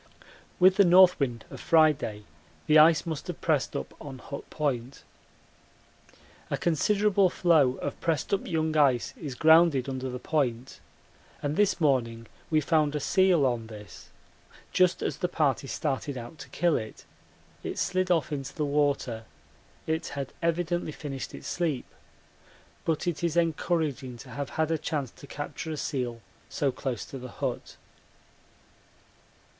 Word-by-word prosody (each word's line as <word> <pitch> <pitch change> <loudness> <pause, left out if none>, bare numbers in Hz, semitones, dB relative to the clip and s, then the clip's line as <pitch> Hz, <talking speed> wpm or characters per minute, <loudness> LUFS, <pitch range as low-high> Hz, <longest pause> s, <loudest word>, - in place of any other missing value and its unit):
With 185 +1 +6
the 200 - +7
north 180 0 +6
wind 120 -5 -2
of - - -8
Friday 150 -10 +3 0.4
the 155 0 +6
ice 160 +2 +6
must 160 -3 -5
have 180 - -5
pressed 150 -5 0
up - - -4
on 140 -3 -8
Hut 140 +2 -9
Point. 135 -3 -3 1.5
A - - -1
considerable 200 +4 +2
floe 155 -8 +3
of - - -5
pressed 165 +2 -1
up 195 - 0
young 160 -2 -1
ice 135 -5 +3
is 140 -5 -6
grounded 160 -3 +5
under 130 -1 -3
the 125 - -4
point, 130 -2 -2 0.6
and 145 +1 -1
this 205 -1 +2
morning 120 -7 +1 0.2
we 155 -1 +3
found 150 -1 +1
a - - 0
seal 185 -2 +3
on 120 -3 -1
this. 105 -3 -12 0.6
Just 180 -1 +3
as - - -2
the 180 - 0
party 145 -5 0
started 140 -1 -2
out 120 +6 -9
to 140 - -10
kill 170 +4 +1
it, 110 0 -8 0.6
it - - -5
slid 185 0 0
off 165 -4 +1
into 135 -3 -5
the 150 - -1
water 140 -6 0 0.6
it 160 0 -1
had 140 -2 -4
evidently 170 0 0
finished 135 -3 -6
its - - -11
sleep 160 -8 -1 1.0
but 160 -2 0
it 175 -1 -2
is 170 0 0
encouraging 155 -6 0
to 125 +2 -12
have 140 +3 -4
had 160 0 +1
a 160 - 0
chance 145 -4 -3
to 140 - -14
capture 145 +3 -6
a 155 - -3
seal 125 -5 -3 0.3
so 140 -2 0
close 125 -2 -4
to 135 - -8
the 125 0 -8
hut. - - -4
150 Hz, 155 wpm, -28 LUFS, 130-165 Hz, 1.5 s, the